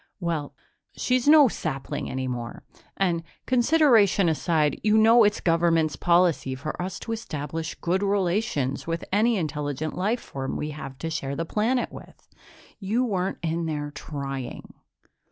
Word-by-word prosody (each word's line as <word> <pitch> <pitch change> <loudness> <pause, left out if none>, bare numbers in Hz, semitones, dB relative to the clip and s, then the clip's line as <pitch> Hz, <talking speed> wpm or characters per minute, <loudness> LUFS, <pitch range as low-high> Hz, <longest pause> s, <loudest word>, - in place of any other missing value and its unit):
"Well, 165 -5 -3 0.4
she's 255 +1 +1
no 300 -2 +8
sapling 140 - -4
any 130 0 -3
more. 120 -2 -5 0.3
And, 175 -4 +1 0.2
consideration 240 - +4
aside, 155 -1 +1
you 215 0 +4
know 225 +2 +6
it's 205 0 +2
government's 165 -2 +2
policy 170 -6 +2
for 150 +6 -5
us 180 0 -4
to 230 - -5
establish 160 -7 -4
good 180 +3 -1
relations 190 - 0
with 165 0 -3
any 220 +3 +3
intelligent 150 -2 -3
life 210 +6 0
form 135 -1 -5
we 150 - -3
have 135 -3 -8
to 165 +3 -4
share 140 -3 -3
a 165 - -1
planet 230 +8 0
with. - - -13 0.5
You 220 +5 0
weren't 190 -4 -1
in 165 0 -1
there 145 -2 -3
trying." 135 -3 -6
170 Hz, 145 wpm, -25 LUFS, 150-210 Hz, 0.5 s, no